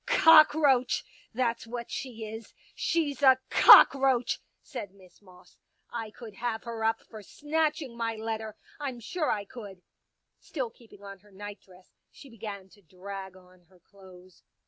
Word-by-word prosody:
Cockroach! 310 Hz, -, +5 dB, 0.3 s
That's 235 Hz, -1 st, -2 dB
what 235 Hz, 0 st, -7 dB
she 230 Hz, -4 st, -6 dB
is. 220 Hz, +1 st, -10 dB, 0.2 s
She's 300 Hz, -5 st, -1 dB
a 265 Hz, -2 st, +6 dB
cockroach 265 Hz, -3 st, +6 dB
1 -, -, -38 dB
" -, -, -49 dB
said 205 Hz, -8 st, -7 dB
Miss 185 Hz, -1 st, -20 dB
Moss. 180 Hz, -2 st, -20 dB, 0.2 s
" -, -, -44 dB
I 225 Hz, -2 st, -5 dB
could 220 Hz, 0 st, -12 dB
have 235 Hz, -2 st, -3 dB
her 230 Hz, -1 st, -6 dB
up 225 Hz, 0 st, 0 dB
for 220 Hz, -2 st, -12 dB
snatching 300 Hz, -, -2 dB
my 230 Hz, -1 st, -3 dB
letter 220 Hz, -1 st, -5 dB
— -, -, -25 dB
I'm 270 Hz, -4 st, -5 dB
sure 310 Hz, +7 st, -3 dB
I 205 Hz, -1 st, -1 dB
could." 200 Hz, -5 st, -11 dB, 0.6 s
Still 255 Hz, -7 st, -5 dB
keeping 220 Hz, -4 st, -19 dB
on 195 Hz, -1 st, -10 dB
her 205 Hz, +2 st, -23 dB
nightdress 195 Hz, -2 st, -12 dB, 0.2 s
she 275 Hz, -, -15 dB
began 205 Hz, -4 st, -8 dB
to 205 Hz, -, -21 dB
drag 190 Hz, +2 st, -9 dB
on 180 Hz, -1 st, -21 dB
her 185 Hz, -1 st, -23 dB
clothes. 185 Hz, -1 st, -18 dB
225 Hz, 165 wpm, -28 LUFS, 195-255 Hz, 0.6 s, a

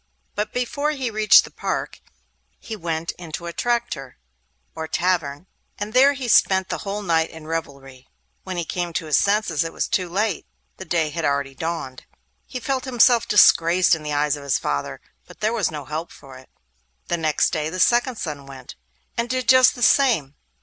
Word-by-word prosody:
But 210 Hz, +1 st, -3 dB
before 285 Hz, +4 st, -2 dB
he 260 Hz, -5 st, -3 dB
reached 215 Hz, 0 st, +6 dB
the -, -, -11 dB
park, -, -, -4 dB, 0.6 s
he 225 Hz, -, -7 dB
went 165 Hz, -3 st, -3 dB
into 170 Hz, -1 st, -7 dB
a 170 Hz, -, -5 dB
traktir 235 Hz, -, -2 dB, 0.6 s
(or 160 Hz, 0 st, -5 dB
tavern), 170 Hz, -4 st, -1 dB, 0.3 s
and 205 Hz, +1 st, -5 dB
there 275 Hz, +3 st, +6 dB
he 270 Hz, -3 st, -5 dB
spent 190 Hz, -4 st, +3 dB
the -, -, -3 dB
whole 205 Hz, 0 st, -4 dB
night 165 Hz, -3 st, +1 dB
in 160 Hz, -1 st, -12 dB
revelry. 140 Hz, -5 st, -6 dB, 0.4 s
When 185 Hz, -, -6 dB
he 170 Hz, -, -2 dB
came 175 Hz, +1 st, -3 dB
to 165 Hz, -, -2 dB
his 155 Hz, -, +3 dB
senses 200 Hz, -6 st, +1 dB
it 165 Hz, -, -5 dB
was -, -, -2 dB
too 180 Hz, -2 st, -1 dB
late; 200 Hz, +1 st, -1 dB, 0.3 s
the 190 Hz, -, -8 dB
day 160 Hz, -3 st, 0 dB
had 165 Hz, +2 st, -4 dB
already 140 Hz, -2 st, -1 dB
dawned. 160 Hz, -4 st, -5 dB, 0.4 s
He 250 Hz, -, -6 dB
felt 260 Hz, +1 st, -2 dB
himself 245 Hz, -2 st, +4 dB
disgraced 180 Hz, -2 st, +5 dB
in 160 Hz, -, 0 dB
the 150 Hz, 0 st, -5 dB
eyes 145 Hz, 0 st, +1 dB
of 145 Hz, -, -9 dB
his 140 Hz, -2 st, 0 dB
father, 70 Hz, 0 st, -3 dB, 0.3 s
but -, -, -15 dB
there 215 Hz, +2 st, 0 dB
was 215 Hz, -8 st, 0 dB
no 150 Hz, -3 st, -7 dB
help 155 Hz, +4 st, -5 dB
for 135 Hz, -1 st, -14 dB
it. 130 Hz, 0 st, -15 dB, 0.6 s
The 175 Hz, -, -1 dB
next 155 Hz, -2 st, +1 dB
day 155 Hz, 0 st, -2 dB
the 185 Hz, +3 st, -6 dB
second 240 Hz, +5 st, +3 dB
son 145 Hz, -8 st, -6 dB
went, 135 Hz, -1 st, -11 dB, 0.4 s
and 235 Hz, +1 st, -2 dB
did 255 Hz, 0 st, -2 dB
just 255 Hz, -1 st, +6 dB
the 245 Hz, -, -4 dB
same. 225 Hz, -, +3 dB
170 Hz, 190 wpm, -22 LUFS, 150-220 Hz, 0.6 s, reached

